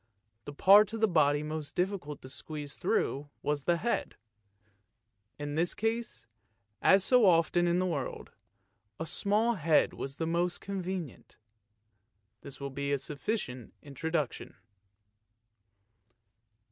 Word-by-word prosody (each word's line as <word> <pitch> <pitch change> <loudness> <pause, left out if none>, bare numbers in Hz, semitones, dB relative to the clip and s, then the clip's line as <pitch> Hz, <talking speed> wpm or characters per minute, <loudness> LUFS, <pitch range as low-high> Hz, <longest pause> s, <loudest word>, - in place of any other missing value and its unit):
The 145 - -7
part 200 +7 +6
of 225 - -3
the 220 - +4
body 150 -5 +3
most 155 -1 -5
difficult 180 -6 -2
to - - -8
squeeze 145 +1 -6
through 145 +2 -1
was 145 -2 -1
the 175 -1 +2
head; 235 +7 -2 1.2
in 145 0 -5
this 165 +3 0
case, 225 - -2 0.6
as 195 0 +5
so 245 -1 +5
often 175 0 +3
in 175 +1 +2
the 185 - +1
world, 150 -7 -4 0.7
a 160 - -3
small 210 +7 +1
head 165 -6 +2
was 135 +1 -6
the 165 - -2
most 170 +2 0
convenient. 185 - -6 1.0
This 140 - -9
will 140 -1 -5
be 140 +1 -3
a 140 - +2
sufficient 140 - -4
introduction. 150 0 -3
165 Hz, 125 wpm, -30 LUFS, 145-190 Hz, 1.2 s, part